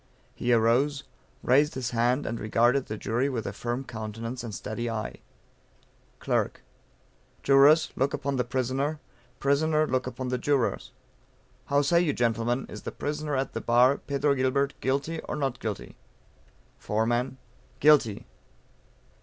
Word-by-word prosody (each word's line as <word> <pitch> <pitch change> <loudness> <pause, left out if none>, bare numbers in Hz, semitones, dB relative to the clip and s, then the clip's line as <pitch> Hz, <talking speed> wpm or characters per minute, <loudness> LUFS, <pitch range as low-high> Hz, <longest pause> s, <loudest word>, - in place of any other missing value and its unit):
He 120 - -1
arose, 125 +5 +2 0.4
raised 145 +4 +3
his 125 -1 -3
hand, 120 +4 +1
and 115 +1 -3
regarded 120 +5 +2
the 110 - -4
jury 120 +7 0
with 115 -5 -3
a - - -4
firm 120 +2 -3
countenance 115 +1 -6
and 115 - -5
steady 115 +3 -4
eye. 110 -1 -4 1.0
Clerk. - - -1 0.8
Jurors 145 +3 +5
look 135 +2 +1
upon 140 0 -2
the 125 - +1
prisoner; 130 +5 -1 0.4
prisoner 155 +3 +2
look 130 -2 -1
upon 125 0 -4
the 125 0 -1
jurors. 135 -2 0 0.7
How 140 0 +2
say 170 +4 +3
you, 155 -5 +1
Gentlemen, 120 +1 0
is - - -9
the - - -6
prisoner 150 0 -3
at 135 0 -2
the - - -3
bar, 125 +3 +4
Pedro 140 0 0
Gilbert, 140 +1 +1
guilty 140 +5 -1
or - - -2
not 135 -4 -2
guilty? 110 -3 -5 0.8
Foreman. 120 +4 -1 0.4
GUILTY. 140 -8 +4
130 Hz, 140 wpm, -27 LUFS, 120-140 Hz, 1.0 s, Jurors